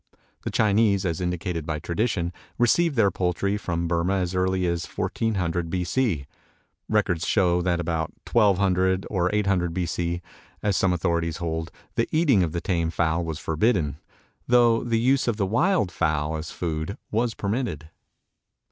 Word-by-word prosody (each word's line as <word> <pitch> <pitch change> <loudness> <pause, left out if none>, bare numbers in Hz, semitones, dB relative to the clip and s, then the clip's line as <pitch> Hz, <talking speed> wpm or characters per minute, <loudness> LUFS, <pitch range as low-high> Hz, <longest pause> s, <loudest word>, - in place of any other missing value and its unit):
The - - -3
Chinese, 105 -2 +2
as 85 -1 -1
indicated 90 -1 -2
by 75 0 -3
tradition, 85 +2 -1 0.2
received 150 +6 +3
their 105 -5 +4
poultry 95 +2 0
from 85 -4 -2
Burmah 85 +3 +1
as 90 0 -2
early 95 0 +1
as 85 -1 0
1400 90 -6 -2
B. 90 +1 -1
C. 90 - 0 0.6
Records 100 -6 +1
show 90 -4 +3
that 90 -1 0
about 80 -2 -2 0.2
1200 95 -3 +3
or 90 -3 +1
800 95 -5 +1
B. 90 -2 0
C., 85 +1 -2 0.4
as 105 -2 +1
some 95 0 +2
authorities 85 -2 0
hold, 80 -1 -3 0.2
the - - 0
eating 150 - +4
of 85 -3 0
the 85 +1 -3
tame 85 -3 0
fowl 80 0 0
was 80 -2 -4
forbidden, 80 - 0 0.5
though 120 -2 +4
the 115 -2 +1
use 130 +3 +2
of 115 -3 0
the 100 - +1
wild 145 - +2
fowl 75 -2 0
as 80 +1 -5
food 85 +1 -3
was 115 +1 0
permitted. 100 - -3
90 Hz, 155 wpm, -25 LUFS, 85-105 Hz, 0.6 s, their